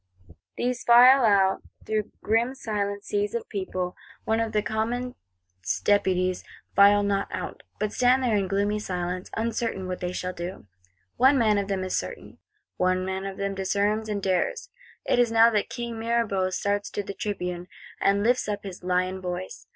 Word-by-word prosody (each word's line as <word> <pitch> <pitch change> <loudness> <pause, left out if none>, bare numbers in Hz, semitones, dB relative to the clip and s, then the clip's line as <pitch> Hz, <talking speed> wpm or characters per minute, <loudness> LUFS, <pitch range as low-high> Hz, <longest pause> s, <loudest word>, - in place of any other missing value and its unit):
These 245 0 -1
file 250 +3 +7
out; 195 -3 +3 0.2
through 215 -1 -2
grim 235 +4 +1
silent 205 -4 -3
seas 205 +1 -1
of 235 - -3
people. 185 -3 -3 0.3
Only 225 0 +1
the 210 -1 0
Commons 235 +4 -2 0.7
Deputies 185 -3 +2 0.3
file 205 +1 +6
not 200 -1 0
out; - - -5 0.2
but 210 0 -1
stand 255 +1 +3
there 235 -4 +2
in 195 -2 +1
gloomy 200 +2 0
silence, 180 -2 -4
uncertain 225 -4 -2
what 185 0 -4
they 180 0 -3
shall 180 0 -4
do. 175 - -7 0.5
One 265 +2 +5
man 215 -4 +3
of 200 - -3
them 195 -2 -1
is 185 - -2
certain; - - -5 0.4
one 185 0 +1
man 190 +1 -3
of 195 - -7
them 200 0 -2
discerns 205 +3 0
and 200 -2 -2
dares! 455 - -1 0.3
It - - +2
is 240 -2 +3
now 230 +1 +6
that 210 -2 0
King 235 -1 -5
Mirabeau 225 -5 0
starts 205 +2 -1
to 205 - -3
the 200 - -6
Tribune, 180 -4 -4 0.3
and 200 +1 +2
lifts 245 -1 +2
up 205 - -3
his 190 -2 -8
lion 185 +1 0
voice. 180 0 -6
205 Hz, 170 wpm, -26 LUFS, 185-225 Hz, 0.7 s, file